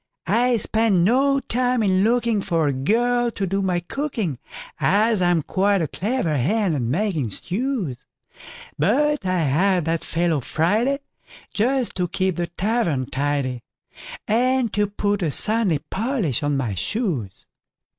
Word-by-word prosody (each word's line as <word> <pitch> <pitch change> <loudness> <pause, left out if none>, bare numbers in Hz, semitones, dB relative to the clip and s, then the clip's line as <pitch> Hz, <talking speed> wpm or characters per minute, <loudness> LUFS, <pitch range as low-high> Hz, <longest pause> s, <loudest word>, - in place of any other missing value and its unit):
I 245 +1 +2
spent 220 -1 +1
no 260 +10 +3
time 250 -2 0
in 190 -1 +2
lookingFor 210 -9 +1
a - - 0
girl 240 - +1
to 200 -4 -3
do 195 +2 -1
my 180 -2 0
cooking, 215 - -3 0.4
As 215 +1 +2
I'm 175 -3 +2
quite 195 +4 +1
a - - -1
clever 175 - -1
hand 195 - +1
at 140 - -1
making 150 - -1
stews; 185 - -3 0.8
But 295 -7 +1
I 185 -1 +1
had 175 +5 +2
that 165 0 -1
fellow 165 -2 0
Friday, 215 - 0 0.5
Just 250 +3 +1
to 180 -1 0
keep 185 0 -1
the 175 -1 -1
tavern 175 - -1
tidy, 135 -3 -1 0.7
And 250 +1 +1
to 205 0 +1
put 205 0 -1
a 165 - +1
Sunday 210 +1 +1
polish 215 - -1
on 145 -1 0
my 120 -6 -2
shoes. 120 - -3
195 Hz, 140 wpm, -22 LUFS, 160-230 Hz, 0.8 s, no